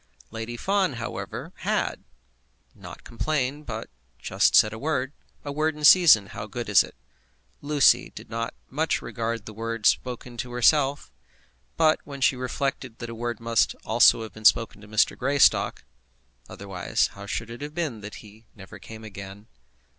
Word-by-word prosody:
Lady 115 +1 -6
Fawn, 195 0 +1
however, 115 -1 -6
had - - -2 0.7
not - - -12
complained, 145 +3 -2
but 110 -1 -5 0.3
just - - +1
said 110 0 +5
a 110 - -7
word. 140 -2 -2 0.3
A 145 - -4
word 155 +2 0
in 150 - -10
season, 150 - +7
how 105 +1 -8
good 120 +1 -6
is 100 -5 +6
it? - - -13 0.7
Lucy 145 -1 +3
did - - -10
not 115 +1 -4
much 155 +4 -1
regard 115 -2 -4
the 110 - -9
word 115 0 -5
spoken 125 -1 0
to 125 0 -5
herself; 135 - +2 0.7
but 155 -1 +4
when 140 -1 -9
she 135 - +3
reflected 130 -1 -3
that 120 0 -7
a - - -6
word 120 0 -4
must 115 -3 +1
also 115 0 +5
have 110 -3 -9
been 110 - -12
spoken 110 -1 +3
to 105 - -13
Mr. 110 0 +2
Greystock, 140 +2 +2 0.7
otherwise 95 -3 -2
how 100 0 -10
should 115 +3 -4
it 120 - -9
have 150 +1 -7
been 150 -11 -3
that 105 +1 -8
he 110 +2 -17
never 95 -3 -12
came 110 0 -11
again? 100 -1 -10
115 Hz, 165 wpm, -25 LUFS, 110-140 Hz, 0.7 s, season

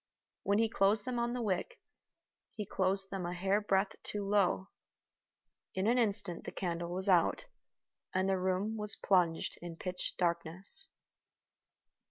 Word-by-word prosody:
When 200 +1 +1
he 225 +1 +3
closed 205 0 +2
them 250 -1 -2
on 235 0 0
the 245 -1 -2
wick, 220 - -2 0.8
he 210 - -4
closed 195 +1 0
them 195 -2 -3
a 175 +1 -3
hair 195 +3 +1
breadth 195 -1 +1
too 205 -1 -4
low. 195 -1 +2 1.1
In 190 +1 0
an 240 +3 +3
instant 200 -6 -1
the - - -6
candle 170 -2 -3
was 185 +3 +1
out, 180 - +3 0.7
and 190 +1 +1
the 190 -1 +1
room 190 +4 0
was 210 0 +5
plunged 175 -6 +1
in 170 -1 -7
pitch 180 +2 -3
darkness. 175 - 0
195 Hz, 150 wpm, -33 LUFS, 180-210 Hz, 1.1 s, was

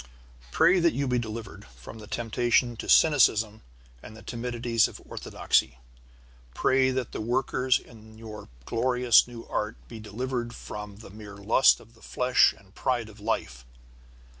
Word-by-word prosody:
Pray 180 - +4
that 170 -1 +2
you 140 0 -1
be 125 -1 +1
delivered 115 -1 -7
from 65 - -13
the 105 - -11
temptation 120 +2 0
to - - -8
cynicism 115 -8 +4 0.4
and 110 - -12
the - - -14
timidities 120 -1 0
of - - -11
orthodoxy. - - -1 0.8
Pray 130 0 +3
that 130 -2 -3
the - - -5
workers 125 +2 +1
in 110 -2 -15
this - - -16
your 110 -2 -10 0.2
glorious 125 0 +3
new 120 -1 -10
art 105 +1 -3
be 115 - -10
delivered 120 +2 -4
from 105 -1 -8
the 105 -1 -13
mere 105 -1 -11
lust 105 +6 +4
of 115 +1 -19
the 115 - -23
flesh 125 0 +3
and 95 -1 -22
pride 120 -3 -2
of 110 0 -15
life. 65 - -3
115 Hz, 160 wpm, -27 LUFS, 110-125 Hz, 0.8 s, Pray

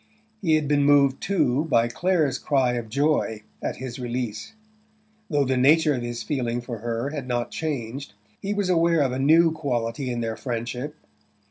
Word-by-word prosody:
He 165 -5 +3
had 155 -2 0
been 145 0 +3
moved, 140 -2 +4
too, 155 -6 +1
by 115 -7 +3
Clare's 155 0 +1
cry 130 -4 +1
of 120 -2 -4
joy 140 -5 0 0.2
at - - -2
his 130 -1 -7
release. 120 - -4 0.8
Though 145 -3 +2
the 130 0 0
nature 150 +4 +5
of 125 - -2
his 120 0 -4
feeling 120 -4 -1
for 120 -2 -6
her 115 +4 -3
had 145 -4 -5
not 120 -1 -2
changed 135 -5 -4 0.3
he 200 - -3
was 205 -2 0
aware 165 -2 +3
of 135 -3 +1
a 130 - -3
new 160 +4 +5
quality 130 -4 -2
in 120 -1 -2
their 115 -1 -2
friendship. 125 +4 -4
135 Hz, 175 wpm, -24 LUFS, 120-150 Hz, 0.8 s, nature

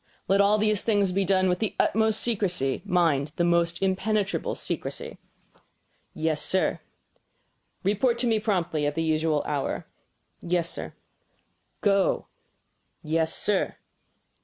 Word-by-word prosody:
"Let 195 +1 +4
all 205 +1 +4
these 215 -1 +2
things 205 -4 +1
be 195 +2 +1
done 185 0 +2
with 180 -1 +1
the 220 - -2
utmost's 220 0 +3
secrecy 185 - 0
mind, 155 -5 +1
the 175 - +1
most 170 0 +2
impenetrable 200 - 0
secrecy." - - -5 1.0
"Yes, 155 -1 0
sir." 190 - 0 1.0
"Report 210 +5 +2
to 240 - 0
me 225 -2 +2
promptly 175 -8 0
at 145 - -2
the 165 - 0
usual 155 -1 +1
hour." 145 -2 -2 0.6
"Yes, 170 -1 0
Sir." - - -7 0.9
"Go!" 195 -2 +2 0.8
"Yes, 160 +1 0
sir." 205 -2 0
185 Hz, 125 wpm, -26 LUFS, 165-210 Hz, 1.0 s, Let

